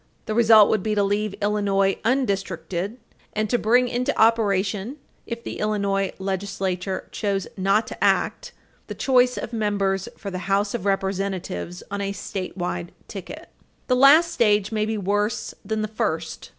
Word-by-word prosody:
The 215 - -2
result 220 -2 +7
would 215 - +2
be 215 +2 -1
to 205 - +3
leave 205 0 0
Illinois 200 -2 +2
undistricted, 195 -5 -1 0.4
and 215 0 0
to 245 - +2
bring 245 +3 +3
into 245 +1 -1
operation, 210 +1 +2 0.3
if 235 0 -5
the - - -6
Illinois 200 -2 0
legislature 190 -1 -3
chose 200 -3 -1
not 195 +3 +2
to - - -6
act, - - +1 0.4
the - - -6
choice 250 -2 +3
of 230 - -5
members 200 -3 0
for 200 - -6
the 185 +1 -5
House 200 +1 +1
of 220 -4 -3
Representatives 195 -2 -2
on 200 0 -2
a 200 0 -2
statewide 185 -3 -4 0.2
ticket. 295 - -8 0.4
The 255 - +2
last 300 +6 +6
stage 210 - +2
may 215 -1 0
be 220 0 -1
worse 205 +2 -1
than 220 -1 -2
the - - -1
first. 170 -8 -3
205 Hz, 155 wpm, -23 LUFS, 195-220 Hz, 0.4 s, result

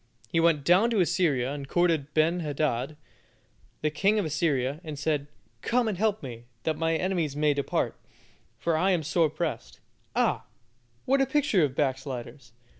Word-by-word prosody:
He 165 - +1
went 165 -3 +3
down 185 +9 +5
to 225 -3 +1
Assyria 160 -8 +1
and 140 -1 -6
courted 165 -3 +1
Ben 165 +3 +3
hadad, 150 -3 -1 0.9
the 155 - +1
king 200 +7 +2
of 205 - +1
Assyria, 150 -2 0
and 155 -3 -6
said, 145 -1 -1 0.3
"Come 240 0 +1
and 215 - -1
help 210 0 0
me, 120 -3 -8 0.2
that 160 - 0
my 165 +1 0
enemies 170 -5 -1
may 150 0 +2
depart, 140 -1 -1 0.6
for 170 -1 0
I 180 +5 +2
am 170 -3 0
sore 160 +1 +2
pressed." 160 +1 -4 0.4
Ah! - - +1 0.6
what 270 +1 +3
a 270 - +2
picture 290 - +2
of 135 -3 0
backsliders. 130 -2 -3
155 Hz, 165 wpm, -27 LUFS, 140-180 Hz, 0.9 s, down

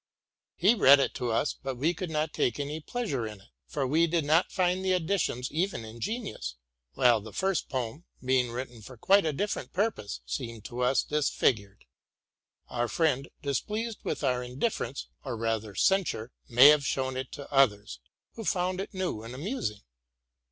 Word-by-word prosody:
'' - - -64
He 200 +6 +5
read 140 - +7
it 135 - +1
to 125 - -3
us;; 115 +6 +1
but 135 -1 -3
we 155 +7 +1
could 175 +1 -5
not 155 -1 -1
take 120 - 0
any 145 +2 -3
pleasure 155 - -3
in 105 -2 -9
it, 100 - -21 0.2
for 140 -3 -2
we 160 +6 +3
did 165 -2 0
not 160 +5 +3
find 185 0 +1
the 190 -1 +2
additions 170 -8 0
even 165 - -1
ingenious: 115 - -5 0.4
while 120 -4 +4
the 110 +1 -10
first 190 - -1
poem, 130 +5 -4 0.2
being 130 -1 +2
written 120 -1 -6
for 125 +4 -11
quite 195 - +4
a - - +2
different. 205 +8 -3
purpose, 180 - -1
seemed 110 - -5
to 120 - -6
us 125 +1 +3
disfigured. 110 -9 0 0.8
Our 120 -1 -1
friend, 145 -2 +1
displeased 210 - -2
with - - -3
our 125 -2 +1
indifference, 125 - -2 0.2
or 125 -4 -4
rather 110 -2 -2
censure, 165 - +1 0.2
may 125 +4 +9
have 150 -1 +5
shown 130 -1 -1
it 130 0 -4
to 140 -2 -8
others, 105 - +3 0.3
who 225 - -7
found 185 -1 0
it 195 - -8
new 185 -13 -2
and 115 +3 -8
amusing. 140 - -3
135 Hz, 175 wpm, -29 LUFS, 120-180 Hz, 0.8 s, may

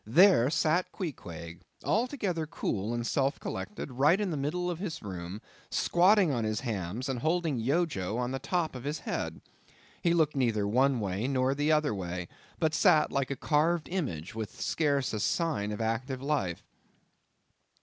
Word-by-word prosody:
there 130 - +6
sat 160 +3 +1
Queequeg, 85 - -6 0.2
altogether 210 - 0
cool 105 -8 -2
and 120 0 -2
self 135 +3 +1
collected; 210 -9 -5
right 145 +9 +4
in 205 -4 -1
the - - -1
middle 155 +6 -1
of 175 -2 -2
the 185 -4 -4
room; 90 0 -6 0.3
squatting 185 0 +4
on 120 -4 0
his 110 0 -1
hams, 110 +1 -3
and 130 -3 -2
holding 160 -2 0
Yojo 120 - 0
on 125 0 -1
top 175 0 -1
of 125 -2 -7
his 145 +2 -2
head. - - -3 0.6
He 170 -1 +3
looked 155 -3 +2
neither 115 -6 +1
one 130 +4 +3
way 100 +3 -1
nor 130 -1 +2
the 145 +2 +1
other 150 -4 +3
way, 90 -2 -4 0.3
but 160 -2 +1
sat 155 -2 +4
like 140 -1 0
a 140 - -1
carved 155 +4 +1
image 120 - -3
with 110 -1 -6
scarce 140 -5 +1
a 110 - -1
sign 145 - 0
of 105 - -4
active 115 +4 -1
life. 120 - -1
135 Hz, 165 wpm, -30 LUFS, 110-165 Hz, 0.6 s, there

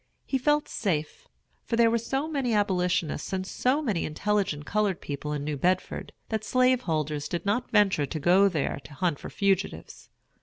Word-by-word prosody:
He 265 - 0
felt 295 +3 +2
safe; 160 -8 -2 0.4
for 230 - -2
there 230 -1 +5
were 235 - +2
so 270 +6 -2
many 270 -7 0
Abolitionists 180 -6 0
and 185 0 -1
so 260 +9 0
many 205 - 0
intelligent 185 -3 -1
colored 205 -2 0
people 145 +1 -5
in 145 -1 -2
New 150 0 -2
Bedford, 185 +5 -1 0.2
that 220 -1 -2
slaveholders 165 - +1
did 175 - -4
not 215 +5 0
venture 195 -9 +3
to 155 - -4
go 185 +6 +5
there 150 -5 -2
to 145 - -12
hunt 165 0 0
for - - -7
fugitives. 195 - -1
195 Hz, 175 wpm, -27 LUFS, 155-230 Hz, 0.4 s, there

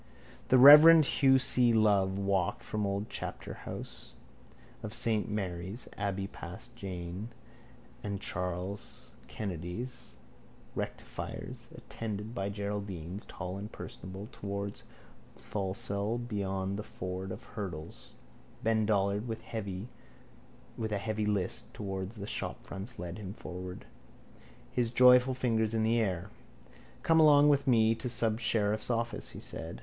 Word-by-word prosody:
The 130 - +5
reverend 150 +4 +11
Hugh 135 -1 +5
C. 125 -2 +5
Love 100 -3 +3
walked 100 -2 0
from 105 - -3
the 100 - +1
old 100 +2 -2
chapterhouse - - -7 0.7
of 105 +1 -5
saint 110 -2 +2
Mary's 95 +1 -4
abbey 100 -1 -2
past - - -9
James 90 +2 -6 0.7
and 100 -2 -3
Charles 90 +1 -4 0.2
Kennedy's, 100 +6 -5 0.6
rectifiers, - - -6
attended 110 0 -5
by 100 -4 -2
Geraldines 100 -2 -4
tall 95 +1 -5
and 105 +2 -7
personable, 95 +3 -7
towards 100 -2 -5 0.5
the - - -20
Tholsel 100 +2 -2
beyond 95 -2 -2
the - - -1
ford 95 -2 -5
of - - -7
hurdles. 85 -7 -7 0.5
Ben 110 -1 +2
Dollard 100 +1 +1
with 115 -1 -4
a 105 +1 -7
heavy 110 +1 -2
list 100 -3 -1
towards 95 0 -4
the 100 -2 -6
shopfronts 105 +2 -5
led 90 0 -5
them 100 -1 -7
forward, 90 0 -7 0.9
his 120 -2 +1
joyful 125 +1 +6
fingers 115 -3 +1
in 110 - +2
the 115 +1 +3
air. 95 -2 -1 0.7
—Come 165 0 +5
along 150 -2 +7
with 140 -1 +3
me 115 -3 +5
to 115 +2 -5
the - - -3
subsheriff's 110 -2 +1
office, 115 0 -1
he - - -8
said. 80 +1 -5
105 Hz, 125 wpm, -31 LUFS, 95-115 Hz, 0.9 s, reverend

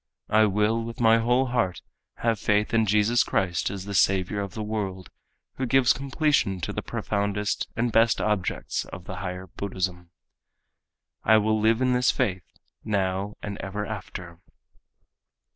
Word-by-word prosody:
I 110 0 +6
will 105 +3 +1
with 115 0 -7
my 115 -1 +5
whole 125 +3 +2
heart 120 -8 -1 0.3
have 115 -2 0
faith 105 +2 +1
in 110 -1 +3
Jesus 105 +4 +3
Christ 90 -3 0
as 95 -2 -6
the 100 - -5
Saviour 95 +2 +2
of 100 -2 -6
the 110 - -3
world 100 -4 -4 0.5
who 130 - -1
gives 130 +1 +4
completion 140 - 0
to - - -3
the - - -3
profoundest 100 0 -2
and 115 +1 0
best 115 +1 +4
objects 105 -4 -1
of 95 - -9
the 95 - -6
higher 90 0 -5
Buddhism. 90 -2 -4 1.1
I 110 - +6
will 110 0 +2
live 110 +3 +3
in 130 0 +3
this 125 0 +3
faith 90 -4 -1 0.3
now 100 -1 -1
and 100 -1 -5
ever 100 +2 -4
after. 90 -5 -7
105 Hz, 155 wpm, -26 LUFS, 95-115 Hz, 1.1 s, I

